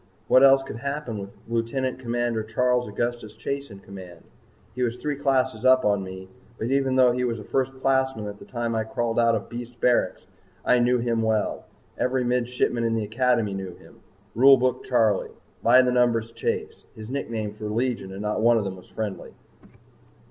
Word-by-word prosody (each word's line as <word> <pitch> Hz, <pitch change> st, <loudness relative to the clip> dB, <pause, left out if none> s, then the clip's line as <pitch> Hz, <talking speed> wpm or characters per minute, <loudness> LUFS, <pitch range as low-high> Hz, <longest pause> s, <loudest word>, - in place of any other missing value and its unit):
What 130 Hz, -, +6 dB
else 135 Hz, 0 st, +6 dB
could 125 Hz, -, -7 dB
happen 140 Hz, -4 st, -4 dB
with 100 Hz, 0 st, -7 dB, 0.2 s
Lieutenant 115 Hz, +3 st, -2 dB
Commander 120 Hz, -2 st, -1 dB
Charles 125 Hz, +3 st, 0 dB
Augustus 120 Hz, 0 st, -3 dB
Chase 140 Hz, -1 st, -4 dB
in 100 Hz, -2 st, -12 dB
command! 90 Hz, -4 st, -11 dB, 0.5 s
He 125 Hz, -, -5 dB
was 120 Hz, -1 st, 0 dB
three 150 Hz, +3 st, -3 dB
classes 130 Hz, -4 st, 0 dB
up 130 Hz, 0 st, +5 dB
on 100 Hz, -2 st, +2 dB
me, 95 Hz, 0 st, -8 dB, 0.3 s
but 115 Hz, +3 st, -3 dB
even 135 Hz, -1 st, +1 dB
though 130 Hz, -1 st, +5 dB
he 125 Hz, +1 st, -1 dB
was 120 Hz, -2 st, -1 dB
a 105 Hz, -, -8 dB
First 135 Hz, +3 st, -2 dB
Classman 130 Hz, -4 st, +1 dB
at 105 Hz, 0 st, -7 dB
the -, -, -12 dB
time 120 Hz, -2 st, -3 dB
I 110 Hz, -1 st, 0 dB
crawled 120 Hz, -1 st, -2 dB
out 115 Hz, -1 st, +4 dB
of 105 Hz, -, -4 dB
Beast 120 Hz, 0 st, -8 dB
Barracks, 120 Hz, -8 st, +1 dB, 0.4 s
I 125 Hz, -, +4 dB
knew 125 Hz, +1 st, +3 dB
him 115 Hz, -1 st, 0 dB
well. 110 Hz, -1 st, -1 dB, 0.3 s
Every 125 Hz, 0 st, +1 dB
Midshipman 125 Hz, -1 st, 0 dB
in 115 Hz, 0 st, +1 dB
the 110 Hz, -, -1 dB
Academy 115 Hz, -1 st, +1 dB
knew 95 Hz, -2 st, -6 dB
him -, -, -18 dB, 0.3 s
Rule 135 Hz, +4 st, +7 dB
Book 125 Hz, 0 st, 0 dB
Charley 115 Hz, -4 st, +2 dB, 0.3 s
By 125 Hz, +2 st, +6 dB
The 125 Hz, -, +1 dB
Numbers 120 Hz, -2 st, +2 dB
Chase 115 Hz, -, -3 dB
his 110 Hz, -1 st, -9 dB
nicknames 110 Hz, -5 st, -4 dB
were 105 Hz, -1 st, -4 dB
legion 115 Hz, -3 st, -2 dB
and 95 Hz, +2 st, -6 dB
not 105 Hz, +1 st, -1 dB
one 120 Hz, +1 st, +5 dB
of 110 Hz, -, 0 dB
them 95 Hz, -1 st, -5 dB
was 90 Hz, -, -16 dB
friendly. 110 Hz, -3 st, -5 dB
120 Hz, 190 wpm, -25 LUFS, 110-125 Hz, 0.5 s, Rule